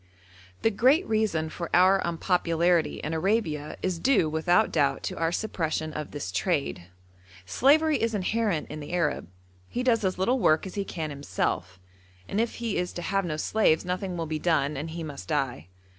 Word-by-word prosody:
The 225 - +4
great 260 - +3
reason 205 -8 0
for 170 -2 -5
our 185 +2 +5
unpopularity 170 -1 +1
in 150 - -3
Arabia 160 -4 -1
is 185 -3 -1
due 225 -7 +3
without 170 +3 +2
doubt 140 - +1
to - - -4
our 165 0 +1
suppression 160 -5 -2
of 150 -1 -5
this 145 -11 -5
trade. 140 - -1 0.6
Slavery 300 - +3
is 230 -1 0
inherent 205 -4 0
in 155 - -6
the 150 +3 -7
Arab; 170 - 0 0.4
he 250 - -2
does 230 -4 +2
as 185 -1 0
little 240 +8 +1
work 155 -5 +3
as 190 - -7
he 200 - -2
can 160 -5 -4
himself, 95 -9 -3 0.5
and 210 - 0
if 235 - -2
he 230 -3 -2
is 180 0 -2
to 175 - -5
have 195 0 0
no 155 -3 -3
slaves 170 -2 +2
nothing 180 0 -3
will 165 - -2
be 155 0 -3
done, 150 -3 +1
and 150 +4 -4
he 165 +1 -5
must 145 -3 -8
die. 135 - -2
175 Hz, 185 wpm, -27 LUFS, 155-205 Hz, 0.6 s, our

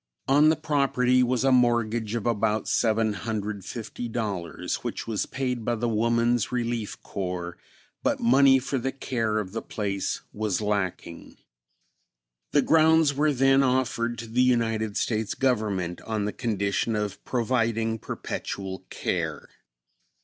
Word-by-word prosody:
On 145 +3 +5
the 160 - +4
property 140 -5 +2
was 125 0 +1
a 135 - +4
mortgage 120 -3 +2
of 115 - -3
about 110 -2 +1
$750, 110 -2 -2
which - - -4
was 110 -2 -2
paid 125 -3 -2
by 120 +2 0
the 120 +1 -1
Woman's 115 +1 +1
Relief 120 -3 -2
Corps, 90 -2 -4 0.5
but - - 0
money 135 +3 +6
for 135 +1 -2
the 135 +2 -2
care 115 -5 -2
of 100 -3 -3
the 115 - -4
place 100 -3 -3
was 105 -3 -1
lacking. 100 -5 -3 1.1
The 145 - +3
grounds 160 -2 +4
were 150 +2 +2
then 135 0 +4
offered 125 -3 0
to 115 - -6
the 120 +3 +1
United 115 -4 +1
States 110 -2 -1
Government 105 -9 0
on 110 -2 -2
the 105 - -2
condition 105 -1 -1
of 105 -2 -3
providing 115 -2 0
perpetual 95 -1 -5
care. - - -3
115 Hz, 130 wpm, -26 LUFS, 105-125 Hz, 1.1 s, money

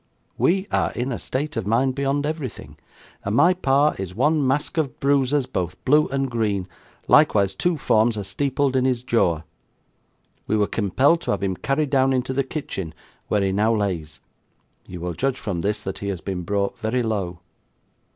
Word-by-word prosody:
'We 190 +2 +2
are - - +1
in 125 +2 -2
a 120 - -3
state 145 +4 -3
of 110 -4 -3
mind 125 +4 +2
beyond 140 +1 0
everything, 135 - -5 0.5
and 100 +2 -1
my 175 +8 +5
pa 145 -4 +2
is 95 -1 -5
one 145 +3 +2
mask 145 +4 0
of 145 -5 -2
brooses 140 0 +2
both 90 -5 -3
blue 150 +3 +4
and 135 0 -1
green 105 -6 -1 0.4
likewise 100 -2 +4
two 175 -2 0
forms 110 -4 +2
are 105 - -3
steepled 135 +6 0
in 130 - +3
his 125 -2 0
Goar. 85 - +1 1.0
We 110 - +1
were 105 - +3
kimpelled 130 - +2
to - - -6
have 100 -1 0
him 95 -1 0
carried 140 +7 -1
down 135 -1 +3
into 130 0 -1
the 135 +1 +1
kitchen 100 - -5 0.3
where 105 -1 +1
he 95 - +1
now 110 +4 +2
lays. 90 -7 -3 0.7
You 90 -2 -8
will 90 0 -3
judge 135 +7 -1
from 95 -8 -3
this 105 +3 -1
that 95 - -5
he 100 - -5
has 95 -3 -2
been 95 -1 -4
brought 100 +3 -2
very 120 +3 0
low. 100 -6 -2
120 Hz, 185 wpm, -23 LUFS, 100-140 Hz, 1.0 s, my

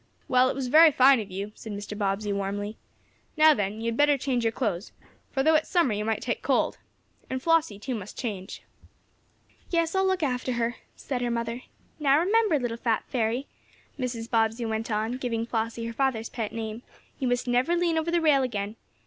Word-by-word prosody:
"Well, 255 -2 +4
it - - -2
was 270 -1 -2
very 315 +5 +7
fine 265 -1 +6
of 210 -2 -6
you," 195 +3 -5
said 220 -1 -8
Mr. 205 +1 -6
Bobbsey, 205 0 -1
warmly. 200 +2 -3 0.6
"Now 310 0 +7
then, 210 -2 -2
you - - -4
had 230 - -5
better 290 -1 +4
change 250 -3 -1
your 225 - +2
clothes, 205 -6 -2 0.4
for, 270 - 0
though 315 +2 +4
it 310 - +5
is - - -18
summer, 340 - +3
you 210 +1 -2
might 220 0 -1
take 235 - -2
cold. 265 -2 +1 0.5
And 260 - -2
Flossie, 320 -7 +2
too, 255 +5 -4
must 210 -4 -7
change." 200 -6 -5 1.1
"Yes, 335 -2 +1
I'll 380 0 +2
look 375 -3 0
after 255 -2 -1
her," 235 0 -1 0.2
said 255 -3 -4
her 245 - 0
mother 235 +1 -2 0.4
"Now 280 -1 +4
remember, 400 +1 +3
little 240 -3 -3
fat 230 -2 0
fairy," 240 +1 0 0.5
Mrs. 240 -3 -3
Bobbsey 225 +1 +1
went 220 +1 -2
on, 220 +3 -1
giving 230 -3 -2
Flossie 230 0 -2
her 230 - -4
father's 235 -3 0
pet 225 -4 -4
name, 225 0 -5 0.4
"you 260 - 0
must 245 +1 0
never 250 +8 +2
lean 340 -2 +1
over 320 +1 -2
the 340 0 +2
rail 300 -4 +4
again. 215 -4 -3
240 Hz, 200 wpm, -27 LUFS, 220-275 Hz, 1.1 s, very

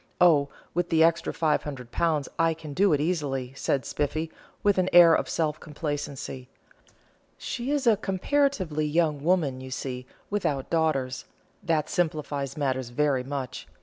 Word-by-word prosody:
Oh, 150 -5 +5 0.2
with 175 +1 -1
the 160 -1 +4
extra 165 0 +2
£500 150 0 -1
I 165 0 +3
can 155 -2 -9
do 195 +4 +3
it 150 - +3
easily," 145 -6 -1
said 135 0 -1
Spiffy, 155 +2 -2 0.3
with 205 -2 +3
an 185 0 +2
air 170 -1 +8
of - - +1
self 155 -2 -1
complacency. 145 -4 -5 0.9
"She 245 +1 -4
is 290 -2 0
a 225 -3 +5
comparatively 195 - 0
young 150 -2 +1
woman, 155 -7 +1
you 130 - -8
see, 125 -1 -5 0.2
without 150 -10 -1
daughters; 135 -6 0 0.4
that 160 -5 0
simplifies 150 -5 -2
matters 130 -4 -1
very 135 0 +1
much. 135 -2 -5
155 Hz, 145 wpm, -27 LUFS, 140-170 Hz, 0.9 s, air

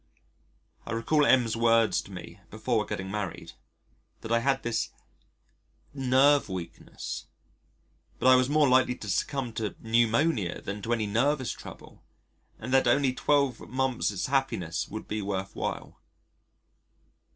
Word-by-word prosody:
I - - -5
recall 145 +6 +2
M 125 -3 +5
's 110 - -2
words 115 -3 +3
to - - -14
me 95 +2 -9
before 110 -1 -1
geting 95 0 -4
married: 105 -4 -5 0.7
that 110 - -7
I 115 - +4
had 135 +2 0
this 120 -1 -1 1.0
"nerve 135 -1 +3
weakness," 90 -3 -7 0.9
but - - -5
I 130 0 +8
was 130 +1 +3
more 150 0 +4
likely 130 -1 +3
to 105 - -9
succumb 120 +5 -2
to 110 -2 -3
pneumonia 115 - +1
than 100 +1 -6
to 115 +3 -1
any 110 -2 0
nervous 130 +5 +1
trouble, - - -11 0.5
and 125 +4 -5
that 135 -2 +4
only 130 +1 +3
12 140 -3 0
months' 125 -6 -1
happiness 130 - -1
would 110 +1 -7
be 105 0 -3
worth 95 -1 -4
while. - - -5
115 Hz, 140 wpm, -28 LUFS, 105-130 Hz, 1.0 s, I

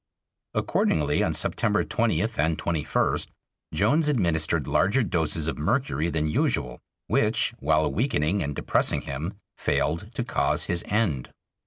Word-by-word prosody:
Accordingly, 75 -2 +1
on - - +1
September - - +1
20th - - 0
and 80 +2 +2
21st, 80 -3 0 0.4
Jones 125 - +2
administered 85 - +1
larger 105 +8 +2
doses 80 -4 0
of 80 - -3
mercury 85 - 0
than 80 -2 -1
usual, 75 - 0 0.3
which, - - +1
while 75 +1 +2
weakening 100 - 0
and 70 -1 -3
depressing - - +1
him, 75 +8 -5 0.2
failed 85 +8 -1
to 120 - -1
cause 115 - +1
his 85 -1 -1
end. 95 - 0
80 Hz, 130 wpm, -26 LUFS, 75-105 Hz, 0.4 s, and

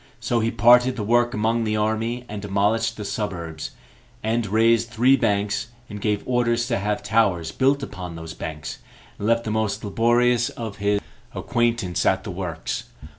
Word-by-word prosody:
So 120 - 0
he 115 0 +1
parted 125 +2 +5
the 110 - -3
work 120 +3 +2
among 115 +2 +1
the 110 -1 0
army, 110 +3 -1
and 105 -1 -6
demolished 105 +3 0
the 105 - -5
suburbs, 85 -7 -4 0.5
end 110 0 0
raised 115 +3 +3
three 120 +4 +4
banks, 105 -2 0 0.2
and 105 0 -7
gave 105 -1 0
orders 120 -1 +1
to 115 - +1
have 105 +1 -2
towers 100 -7 +1
built 135 +7 +2
upon 90 -9 -7
those 80 -1 -7
banks, 75 -2 -6 0.4
and 100 - -2
left 115 0 +3
the 110 - -3
most 110 -1 -1
laborious 120 +3 +2
of 110 -4 -7
his 100 0 +1 0.3
acquaintance 115 -6 0
at 95 0 +2
the 105 - -5
works. 90 -3 -4
110 Hz, 170 wpm, -23 LUFS, 100-115 Hz, 0.5 s, parted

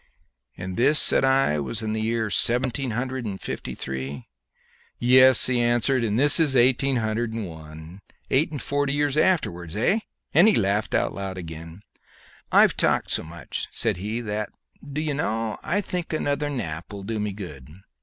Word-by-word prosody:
"And 90 +1 -6
this," 140 +5 +4
said - - +6
I, 135 - +2
"was 70 - -4
in 110 0 -2
seventeen 125 +2 +1
hundred 130 +3 -3
and 100 -4 -5
fifty - - -6
three?" 65 0 -6 0.7
"Yes," 130 +1 +6
he 125 -1 +1
answered; 120 +2 +1
"and 110 0 0
this 145 +4 +5
is 150 -5 +2
eighteen 130 +2 +3
hundred 110 0 -2
and 110 -3 -4
one 80 +2 -11 0.3
eight 145 +5 +3
and 150 -3 -6
forty 140 +2 -1
years 145 -1 0
afterwards, 90 - 0
hey?" 195 - +1 0.3
and 175 +7 +6
he 220 - +5
laughed 100 +1 0
out 95 -1 -2
again. 85 +2 -9 0.7
"I've - - +5
talked - - 0
so - - +1
much," 85 +2 -7
said - - -1
he, 105 +6 -4
"that, 105 -1 -4 0.3
d'ye 150 +1 -4
know, 115 -6 -2
I 200 +5 -1
think 180 -4 -5
another 145 -1 -1
nap 85 - -5
will 100 -1 -8
do 110 +2 -4
me 105 0 -2
good. 75 -10 -9
115 Hz, 165 wpm, -24 LUFS, 95-135 Hz, 0.7 s, said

